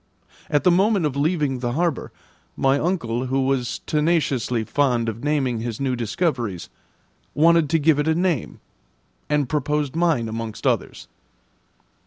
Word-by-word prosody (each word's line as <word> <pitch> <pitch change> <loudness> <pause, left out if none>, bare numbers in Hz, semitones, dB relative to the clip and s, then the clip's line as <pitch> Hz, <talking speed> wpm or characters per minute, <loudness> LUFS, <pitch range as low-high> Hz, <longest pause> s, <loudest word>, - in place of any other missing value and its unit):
At 145 - +1
the 180 - +5
moment 195 0 +3
of 145 -3 -1
leaving 145 -3 0
the 120 -1 -2
harbour, 170 -1 -1 0.5
my 135 +1 +2
uncle, 130 -8 -1
who 135 +1 0
was 130 -3 -1
tenaciously 145 -7 0
fond 125 -2 +1
of 115 +2 -5
naming 140 -6 0
his 115 -1 -4
new 135 -2 0
discoveries, 120 - -2 0.6
wanted 165 0 +4
to 165 - +3
give 155 -1 +3
it 150 - 0
a 160 - +2
name, 170 - -1 0.7
and 150 -2 +1
proposed 150 0 -1
mine 165 -9 +1
amongst 110 0 -6
others. - - -1
140 Hz, 145 wpm, -22 LUFS, 120-160 Hz, 0.7 s, the